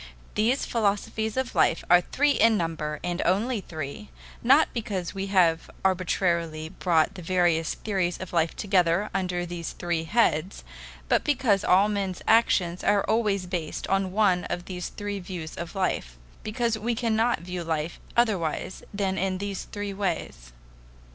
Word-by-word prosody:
These 235 Hz, +6 st, +1 dB
philosophies 220 Hz, +1 st, -1 dB
of 260 Hz, -2 st, -1 dB
life 165 Hz, -, +2 dB
are 175 Hz, 0 st, +6 dB
three 290 Hz, +10 st, +1 dB
in 225 Hz, -4 st, +4 dB
number, 155 Hz, -3 st, -3 dB
and 175 Hz, 0 st, -2 dB
only 210 Hz, +5 st, +1 dB
three, 160 Hz, +5 st, -7 dB, 0.3 s
not 275 Hz, +6 st, +5 dB
because 200 Hz, -7 st, -3 dB
we 195 Hz, 0 st, -3 dB
have 175 Hz, -4 st, +3 dB, 0.2 s
arbitrarily 170 Hz, -4 st, 0 dB
brought 170 Hz, +1 st, +1 dB
the 190 Hz, -, -9 dB
various 170 Hz, -2 st, +1 dB
theories 185 Hz, -5 st, -1 dB
of 185 Hz, -1 st, -8 dB
life 165 Hz, -1 st, +1 dB
together 190 Hz, -1 st, +1 dB
under 180 Hz, -2 st, -1 dB
these 170 Hz, -1 st, -5 dB
three 170 Hz, -2 st, -2 dB
heads, 180 Hz, -3 st, +1 dB, 0.4 s
but -, -, +2 dB
because 255 Hz, -9 st, +2 dB
all 190 Hz, +3 st, +5 dB
men's 200 Hz, -3 st, -2 dB
actions 185 Hz, -6 st, +3 dB
are 200 Hz, -1 st, +3 dB
always 210 Hz, -4 st, +1 dB
based 175 Hz, -4 st, -4 dB
on 195 Hz, -1 st, +1 dB
one 190 Hz, -3 st, +2 dB
of 175 Hz, 0 st, -4 dB
these 180 Hz, -2 st, -5 dB
three 205 Hz, -1 st, -5 dB
views 175 Hz, -4 st, -7 dB
of 170 Hz, +3 st, -7 dB
life 60 Hz, -, -1 dB, 0.2 s
because 225 Hz, 0 st, -1 dB
we 235 Hz, +2 st, -1 dB
cannot 230 Hz, -2 st, +1 dB
view 180 Hz, 0 st, -5 dB
life 160 Hz, 0 st, -3 dB, 0.2 s
otherwise 190 Hz, -7 st, 0 dB
than 195 Hz, -2 st, -1 dB
in 190 Hz, 0 st, 0 dB
these 200 Hz, 0 st, -4 dB
three 205 Hz, -1 st, -5 dB
ways. 170 Hz, -, -3 dB
185 Hz, 155 wpm, -26 LUFS, 170-210 Hz, 0.4 s, are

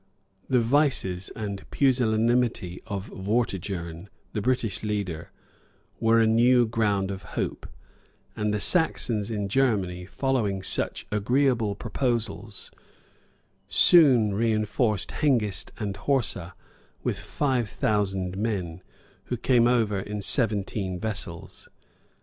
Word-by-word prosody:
[] 95 Hz, -1 st, -38 dB
The -, -, +6 dB
vices, 115 Hz, -8 st, +1 dB
and 100 Hz, -3 st, -6 dB
pusillanimity 120 Hz, -6 st, +1 dB
of 100 Hz, -1 st, -4 dB
Vortigern, 95 Hz, -4 st, -3 dB, 0.2 s
the 105 Hz, -, -2 dB
British 120 Hz, -4 st, -1 dB
leader, 100 Hz, -6 st, -3 dB, 0.7 s
were 115 Hz, 0 st, +4 dB
a 115 Hz, -, +4 dB
new 120 Hz, +2 st, +4 dB
ground 105 Hz, -4 st, 0 dB
of 95 Hz, 0 st, -6 dB, 0.2 s
hope; -, -, -3 dB, 0.7 s
and 105 Hz, 0 st, -1 dB
the 105 Hz, -, -1 dB
Saxons 115 Hz, -, +1 dB
in 105 Hz, -3 st, -2 dB
Germany, 95 Hz, -7 st, 0 dB
following 110 Hz, -7 st, -1 dB
such -, -, 0 dB
agreeable 115 Hz, 0 st, +1 dB
prospects, 115 Hz, -5 st, -3 dB, 1.0 s
soon 130 Hz, -, +6 dB
reënforced 110 Hz, 0 st, 0 dB
Hengist 115 Hz, -, +1 dB
and 100 Hz, -2 st, -3 dB
Horsa 110 Hz, -10 st, 0 dB, 0.5 s
with -, -, -2 dB
five 130 Hz, -6 st, -1 dB
thousand 95 Hz, -4 st, -1 dB
men, 95 Hz, -6 st, -3 dB, 0.4 s
who 125 Hz, -, -3 dB
came 120 Hz, 0 st, +3 dB
over 110 Hz, -5 st, +2 dB
in 105 Hz, +2 st, -5 dB
seventeen 100 Hz, -4 st, -1 dB
vessels. 95 Hz, -5 st, -5 dB
105 Hz, 110 wpm, -26 LUFS, 95-120 Hz, 1.0 s, The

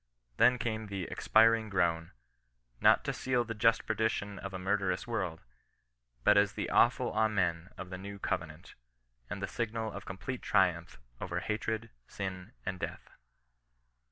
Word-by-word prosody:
Then 125 Hz, -, +6 dB
came 110 Hz, -2 st, -3 dB
the 100 Hz, -2 st, -4 dB
expiring 110 Hz, 0 st, +4 dB
groan 85 Hz, -4 st, 0 dB, 0.3 s
— -, -, -45 dB, 0.3 s
not -, -, +6 dB
to -, -, -2 dB
seal 125 Hz, -2 st, 0 dB
the 115 Hz, -1 st, -5 dB
just 115 Hz, +2 st, +3 dB
perdition 110 Hz, -2 st, -1 dB
of 95 Hz, -, -6 dB
a 95 Hz, -, -4 dB
murderous 95 Hz, +2 st, 0 dB
world, 95 Hz, -9 st, -3 dB, 0.8 s
but -, -, +6 dB
as 100 Hz, 0 st, +2 dB
the -, -, -3 dB
awful 125 Hz, +1 st, +4 dB
ainxen 95 Hz, -6 st, +1 dB
of 95 Hz, -1 st, -7 dB
the 90 Hz, -, -5 dB
New 100 Hz, +1 st, -7 dB
Covenant, 80 Hz, -4 st, -4 dB, 0.6 s
and -, -, -5 dB
the -, -, 0 dB
signal 115 Hz, -1 st, -3 dB
of 100 Hz, 0 st, -8 dB
complete 120 Hz, +7 st, -5 dB
triumph 90 Hz, -4 st, +1 dB, 0.2 s
over -, -, -2 dB
hatred, 110 Hz, +2 st, -2 dB, 0.2 s
sin, 95 Hz, +1 st, -6 dB
and 95 Hz, 0 st, -3 dB
death -, -, -6 dB
100 Hz, 155 wpm, -32 LUFS, 95-110 Hz, 0.8 s, Then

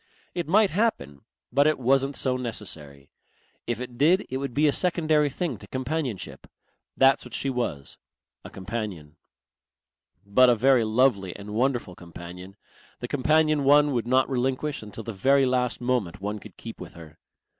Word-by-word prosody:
It 175 Hz, -3 st, -3 dB
might 200 Hz, +4 st, +4 dB
happen, 160 Hz, -, -1 dB, 0.3 s
but 140 Hz, +3 st, +4 dB
it 155 Hz, -, +2 dB
wasn't 135 Hz, +2 st, +1 dB
so 130 Hz, -1 st, +1 dB
necessary.... 80 Hz, -, -7 dB, 0.6 s
If 120 Hz, -1 st, -2 dB
it 125 Hz, -1 st, -8 dB
did 175 Hz, +7 st, +4 dB
it 130 Hz, -, -1 dB
would 135 Hz, -2 st, -5 dB
be 150 Hz, +2 st, +3 dB
a 145 Hz, -, +2 dB
secondary 155 Hz, -4 st, +1 dB
thing 140 Hz, -, -4 dB
to 100 Hz, -, -13 dB
companionship. 130 Hz, -, -4 dB, 0.5 s
That's 135 Hz, +1 st, +4 dB
what -, -, -8 dB
she 135 Hz, -, -1 dB
was, 120 Hz, -, -4 dB, 0.4 s
a -, -, -9 dB
companion. 95 Hz, -7 st, -6 dB, 1.1 s
But 125 Hz, +6 st, +5 dB
a 120 Hz, -, +5 dB
very 130 Hz, +1 st, +4 dB
lovely 110 Hz, -5 st, +1 dB
and 105 Hz, +1 st, -9 dB
wonderful 120 Hz, -4 st, 0 dB
companion, 90 Hz, +2 st, -11 dB, 0.4 s
the 120 Hz, -, -5 dB
companion 155 Hz, +2 st, +2 dB
one 145 Hz, +1 st, +5 dB
would 120 Hz, -3 st, -1 dB
not 130 Hz, +1 st, +3 dB
relinquish 135 Hz, +3 st, -2 dB
until 105 Hz, +1 st, -9 dB
the 115 Hz, -, -6 dB
very 135 Hz, +7 st, +3 dB
last 125 Hz, -1 st, 0 dB
moment 120 Hz, -7 st, -1 dB
one 105 Hz, +2 st, -4 dB
could -, -, -14 dB
keep -, -, -9 dB
with -, -, -10 dB
her. 80 Hz, -3 st, -13 dB
125 Hz, 165 wpm, -25 LUFS, 105-140 Hz, 1.1 s, But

